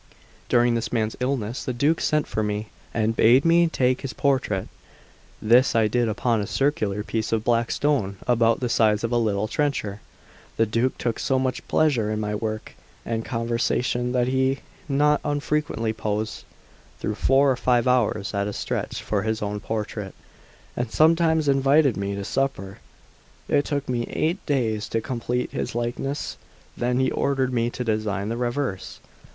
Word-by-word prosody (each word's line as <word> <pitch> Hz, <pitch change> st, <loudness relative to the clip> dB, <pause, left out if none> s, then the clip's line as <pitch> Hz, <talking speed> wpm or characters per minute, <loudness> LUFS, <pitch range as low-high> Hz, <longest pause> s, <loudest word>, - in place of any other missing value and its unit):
During 120 Hz, 0 st, +4 dB
this 115 Hz, -1 st, -2 dB
man's 110 Hz, -2 st, 0 dB
illness 125 Hz, -3 st, -2 dB
the 130 Hz, -, -3 dB
Duke 145 Hz, +7 st, +1 dB
sent 150 Hz, -1 st, +1 dB
for 110 Hz, -, -2 dB
me, 105 Hz, 0 st, -2 dB, 0.2 s
and 110 Hz, 0 st, 0 dB
bade 125 Hz, +7 st, +5 dB
me 170 Hz, +1 st, +5 dB
take 130 Hz, -5 st, +1 dB
his 135 Hz, -, -5 dB
portrait; 130 Hz, -9 st, 0 dB, 0.7 s
this 120 Hz, +4 st, +4 dB
I 110 Hz, -1 st, +4 dB
did 120 Hz, +1 st, +1 dB
upon 115 Hz, +1 st, 0 dB
a 100 Hz, -, -3 dB
circular 105 Hz, -8 st, 0 dB
piece 110 Hz, 0 st, -2 dB
of 110 Hz, -1 st, +1 dB
black 115 Hz, 0 st, +1 dB
stone 130 Hz, -10 st, 0 dB
about 115 Hz, -1 st, +2 dB
the 125 Hz, -, 0 dB
size 110 Hz, -2 st, +2 dB
of 115 Hz, -, -1 dB
a 120 Hz, -, +2 dB
little 110 Hz, -2 st, 0 dB
trencher. 110 Hz, -7 st, -2 dB, 0.6 s
The 115 Hz, -, +4 dB
Duke 115 Hz, +4 st, 0 dB
took 120 Hz, -2 st, -2 dB
so 135 Hz, -, +1 dB
much 130 Hz, -1 st, -2 dB
pleasure 130 Hz, -9 st, +2 dB
in 110 Hz, 0 st, -1 dB
my 105 Hz, -1 st, -2 dB
work 110 Hz, +1 st, -4 dB, 0.3 s
and 115 Hz, -1 st, -2 dB
conversation, 120 Hz, +1 st, -1 dB
that 125 Hz, -1 st, +2 dB
he 130 Hz, +1 st, +1 dB, 0.3 s
not 145 Hz, +1 st, +3 dB
unfrequently 145 Hz, -6 st, -1 dB
posed 110 Hz, 0 st, -3 dB, 0.5 s
through 105 Hz, -, -2 dB
four 135 Hz, +5 st, +3 dB
or -, -, +1 dB
five 125 Hz, -1 st, +2 dB
hours 115 Hz, -5 st, +1 dB
at 100 Hz, 0 st, 0 dB
a 105 Hz, -, -4 dB
stretch -, -, -3 dB
for 105 Hz, -2 st, 0 dB
his 110 Hz, 0 st, -2 dB
own 105 Hz, 0 st, -3 dB
portrait, 105 Hz, -2 st, -4 dB, 0.6 s
and 120 Hz, -1 st, -2 dB
sometimes 160 Hz, -1 st, +3 dB
invited 135 Hz, 0 st, +4 dB
me 100 Hz, 0 st, -3 dB
to 100 Hz, -, -4 dB
supper. 100 Hz, -7 st, -2 dB, 0.7 s
It 145 Hz, -, +2 dB
took 145 Hz, -2 st, -2 dB
me 120 Hz, -2 st, -1 dB
eight 170 Hz, +5 st, -1 dB
days 110 Hz, -6 st, 0 dB
to 115 Hz, -, 0 dB
complete 125 Hz, 0 st, -2 dB
his -, -, -4 dB
likeness; 120 Hz, +4 st, -3 dB, 0.4 s
then 125 Hz, +1 st, 0 dB
he 130 Hz, 0 st, +2 dB
ordered 135 Hz, -2 st, 0 dB
me 120 Hz, -1 st, +1 dB
to 125 Hz, -, -4 dB
design 105 Hz, -3 st, -1 dB
the 115 Hz, -, -2 dB
reverse. 120 Hz, -4 st, -3 dB
120 Hz, 170 wpm, -24 LUFS, 110-135 Hz, 0.7 s, bade